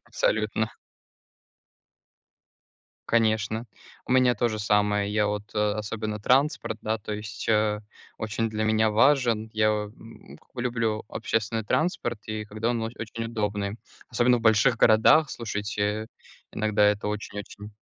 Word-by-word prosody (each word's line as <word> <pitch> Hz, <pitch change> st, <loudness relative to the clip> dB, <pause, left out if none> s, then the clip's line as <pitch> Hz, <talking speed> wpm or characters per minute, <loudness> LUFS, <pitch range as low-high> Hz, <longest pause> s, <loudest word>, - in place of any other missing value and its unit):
Абсолютно. 110 Hz, 0 st, 0 dB, 2.4 s
Конечно, 110 Hz, 0 st, +1 dB, 0.4 s
у -, -, -5 dB
меня 125 Hz, -1 st, +4 dB
то 120 Hz, -, +1 dB
же 110 Hz, -2 st, -4 dB
самое, 105 Hz, 0 st, +1 dB
я 105 Hz, 0 st, +2 dB
вот, 105 Hz, 0 st, -4 dB
э, -, -, -4 dB, 0.2 s
особенно 110 Hz, 0 st, -4 dB
транспорт, 130 Hz, 0 st, +1 dB
да, 110 Hz, +1 st, -1 dB
то 105 Hz, 0 st, -6 dB
есть, 105 Hz, 0 st, -6 dB
э, 105 Hz, -1 st, +2 dB, 0.4 s
очень 110 Hz, +1 st, -2 dB
для 110 Hz, 0 st, -2 dB
меня 110 Hz, 0 st, +3 dB
важен. 115 Hz, -1 st, +3 dB
Я, 110 Hz, 0 st, +2 dB
м, 105 Hz, +2 st, -6 dB
как -, -, -30 dB
бы 125 Hz, -, -5 dB
люблю 115 Hz, -3 st, -1 dB
общественный 110 Hz, 0 st, -2 dB
транспорт, 120 Hz, -, -1 dB
и 110 Hz, 0 st, -4 dB
когда 110 Hz, +2 st, -2 dB
он 120 Hz, -2 st, -1 dB
оч 115 Hz, +1 st, -4 dB
очень 115 Hz, +1 st, -5 dB
удобный, 105 Hz, -2 st, -2 dB, 0.3 s
особенно 120 Hz, +1 st, +3 dB
в -, -, -6 dB
больших 110 Hz, +1 st, +4 dB
городах, 115 Hz, +8 st, +5 dB
слушайте, 105 Hz, -1 st, -3 dB, 0.4 s
иногда 105 Hz, -1 st, +1 dB
это 105 Hz, 0 st, +1 dB
очень-очень 105 Hz, 0 st, -6 dB
110 Hz, 140 wpm, -26 LUFS, 105-115 Hz, 2.4 s, городах